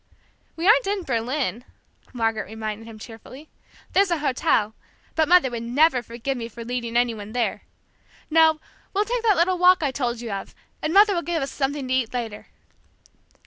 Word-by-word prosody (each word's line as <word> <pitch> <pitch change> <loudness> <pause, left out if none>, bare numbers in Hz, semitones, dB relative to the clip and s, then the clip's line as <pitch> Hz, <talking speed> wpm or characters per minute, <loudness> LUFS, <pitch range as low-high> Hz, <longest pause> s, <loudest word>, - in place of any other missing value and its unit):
"We 330 - -4
aren't - - +5
in 400 -1 -1
Berlin," 245 -1 -2 0.5
Margaret 225 -4 -1
reminded 220 +1 -6
him 225 -1 -10
cheerfully. 240 +7 -12 0.4
"There's 395 -1 +4
a 340 - +1
hotel, 245 -7 +1 0.4
but 315 -1 +2
Mother 350 -7 +5
would 235 -1 -4
never 255 +3 +3
forgive 240 +3 -4
me 230 - -4
for 230 +1 -9
leading 240 -1 -2
any 240 -1 +2
one 210 0 -9
there! 245 -2 -1 0.6
No, 320 0 +4 0.4
we'll 410 +2 +2
take 485 +1 -1
that 440 -3 +3
little 355 +2 +2
walk 360 -1 +5
I 280 - +1
told 245 -3 -2
you 235 -2 -6
of, 195 -1 -6 0.3
and 305 - -1
Mother 405 +3 +6
will 345 - 0
give 340 -4 -2
us 270 - -4
something 275 -1 -2
to 255 - -1
eat 255 -2 0
later. 225 -4 -5
260 Hz, 185 wpm, -24 LUFS, 230-330 Hz, 0.6 s, Mother